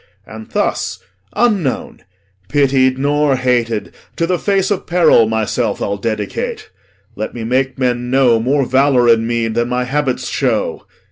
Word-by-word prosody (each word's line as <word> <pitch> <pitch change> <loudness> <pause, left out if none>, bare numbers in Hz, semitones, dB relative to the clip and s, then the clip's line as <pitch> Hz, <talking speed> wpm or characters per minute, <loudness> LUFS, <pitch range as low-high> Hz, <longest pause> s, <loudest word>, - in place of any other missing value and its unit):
And 110 0 -11
thus - - -1 0.4
unknown, 205 - 0 0.5
Pitied 130 -2 +2
nor 145 0 +1
hated, 115 -6 -1 0.2
to 165 - 0
the 180 0 -1
face 195 -1 0
of 200 - -2
peril 165 -10 +4
Myself 110 -1 -1
I'll 100 0 -2
dedicate. 115 - -4 0.4
Let - - -5
me 115 - -5
make 130 +3 0
men 125 -1 -1
know 125 -3 +3
More 135 +4 +1
valour 130 -1 +3
in 115 -1 +3
me 115 -1 0
than 120 +2 -1
my 125 0 0
habits 130 -2 -2
show. 115 -10 -1
130 Hz, 145 wpm, -16 LUFS, 115-145 Hz, 0.5 s, peril